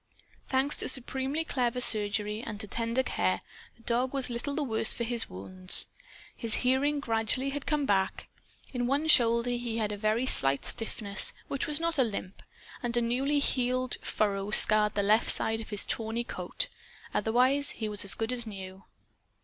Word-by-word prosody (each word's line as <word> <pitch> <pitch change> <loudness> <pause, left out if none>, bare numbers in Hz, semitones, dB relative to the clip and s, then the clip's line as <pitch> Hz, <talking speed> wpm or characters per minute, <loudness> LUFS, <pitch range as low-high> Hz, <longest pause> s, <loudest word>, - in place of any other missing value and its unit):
Thanks 270 +2 +2
to - - +2
supremely 265 +4 -2
clever 250 -4 -1
surgery 210 -2 +2
and 215 -4 -7
to 210 - -3
tender 230 +4 -1
care, - - -1 0.4
the 230 - -24
dog 245 +3 0
was 265 -2 -2
little 245 +4 -4
the 310 - -1
worse 225 -4 +2
for 235 - -3
his 235 0 -2
wounds. 185 - +1 0.5
His 230 -2 -2
hearing 280 +3 +1
gradually 230 +2 -1
had 285 0 -6
come 300 -2 0
back. 190 -5 -1 0.5
In 245 -1 -2
one 285 +4 0
shoulder 235 -4 +4
he 240 -2 -3
had 215 -2 -1
a 205 - -5
very 215 +4 0
slight 135 - +1
stiffness 210 -3 +1 0.2
which 275 +2 -3
was 300 -1 +1
not 335 -2 -2
a - - +5
limp, 200 -4 -6 0.4
and 240 -1 +1
a - - +4
new 240 +3 -1
healed 255 -2 0
furrow 200 -1 -1
scarred 215 0 +7
the 200 - 0
left 215 +3 +2
side 225 0 +2
of 220 - -10
his 205 -2 +2
tawny 225 +1 -2
coat. - - -4 0.5
Otherwise 255 +6 +1
he 220 - -5
was 210 -1 -2
as 200 - 0
good 225 +1 -3
as 240 -2 -2
new. 190 -2 -9
235 Hz, 180 wpm, -28 LUFS, 215-260 Hz, 0.5 s, scarred